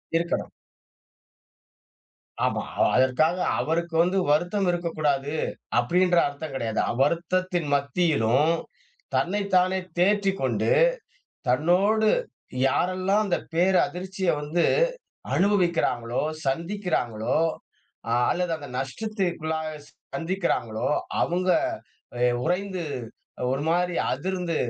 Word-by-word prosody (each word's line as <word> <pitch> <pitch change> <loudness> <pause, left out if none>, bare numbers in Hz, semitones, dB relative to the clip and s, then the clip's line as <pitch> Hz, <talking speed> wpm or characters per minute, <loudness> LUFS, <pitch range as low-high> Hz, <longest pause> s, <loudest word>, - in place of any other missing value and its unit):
இருக்கலாம். 170 +1 -1 1.9
ஆமா, - - 0 0.2
அ - - +7
அதற்காக 130 +7 +3 0.2
அவருக்கு 165 +1 -1
வந்து 185 +2 0
வருத்தம் 175 +6 +2
இருக்கக்கூடாது. 155 -4 -1 0.4
அப்படின்ற 175 +8 +3
அர்த்தம் 145 0 -7
கிடையாது. 115 -4 -2
அவ்வருத்தத்தின் 170 +5 0
மத்தியிலும் 140 -1 +2 0.6
தன்னை 205 +4 +1
தானே 185 +1 +3 0.2
தேற்றிக் 195 +1 +2
கொண்டு. - - +1 0.8
தன்னோடு 190 - +3 0.6
யாரெல்லாம் 185 +7 +1
அந்த 180 -4 +1 0.2
பேர் 180 +3 +3
அதிர்ச்சிய 185 +1 -3
வந்து, 155 +4 +1 0.7
அனுபவிக்கிறாங்களோ! 170 - +1 0.3
சந்திக்கிறாங்களோ! 160 - -1 0.7
அ - - -1 0.2
அல்லது 180 -1 -1
அந்த 145 - -9
நஷ்டத்துக்குள்ளாக 160 - -2 0.5
சந்திக்கிறாங்களோ 165 - -1 0.3
அவங்க 180 +2 0 0.7
அ - - -5 0.2
உறைந்து 185 +1 -1 0.7
ஒரு 135 - -1
மாரி 175 +1 +1 0.2
அதிர்ந்து 180 +3 -2
175 Hz, 85 wpm, -25 LUFS, 145-185 Hz, 1.9 s, அ